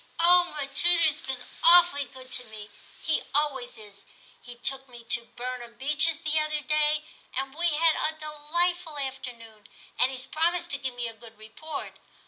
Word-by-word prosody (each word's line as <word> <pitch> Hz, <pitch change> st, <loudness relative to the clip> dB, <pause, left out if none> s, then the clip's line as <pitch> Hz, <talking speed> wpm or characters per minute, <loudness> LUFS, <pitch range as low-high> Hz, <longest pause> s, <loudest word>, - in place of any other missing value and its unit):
*0h! 350 Hz, -1 st, +4 dB
m' 275 Hz, 0 st, -8 dB
tutor's 335 Hz, -3 st, +4 dB
been 265 Hz, -2 st, -6 dB, 0.2 s
awfully 340 Hz, -4 st, +6 dB
good 255 Hz, 0 st, -14 dB
to 250 Hz, -, +1 dB
me; 215 Hz, -1 st, -11 dB, 0.3 s
he 315 Hz, -, +1 dB
always 280 Hz, -4 st, -1 dB
is; 205 Hz, -2 st, -14 dB, 0.4 s
he 245 Hz, -1 st, -10 dB
took 270 Hz, +2 st, -1 dB
me 240 Hz, -1 st, -11 dB
to 235 Hz, 0 st, 0 dB
Burnham 245 Hz, -1 st, -6 dB
Beeches 300 Hz, +5 st, +3 dB
the 310 Hz, -1 st, +1 dB
other 305 Hz, 0 st, -1 dB
day, 300 Hz, +1 st, +1 dB, 0.3 s
and 270 Hz, +1 st, -3 dB
we 340 Hz, +3 st, 0 dB
had 320 Hz, 0 st, +3 dB
a 315 Hz, 0 st, -1 dB
delightful 315 Hz, +2 st, -1 dB
afternoon, 245 Hz, -6 st, -7 dB, 0.3 s
and 255 Hz, -, +4 dB
he*s 260 Hz, -1 st, -3 dB
promised 340 Hz, +4 st, 0 dB
to 280 Hz, -, -2 dB
give 260 Hz, -2 st, -4 dB
me 240 Hz, -1 st, -3 dB
a 230 Hz, -, -7 dB
good 225 Hz, -1 st, -15 dB
report. 280 Hz, +8 st, -8 dB
280 Hz, 170 wpm, -27 LUFS, 245-315 Hz, 0.4 s, awfully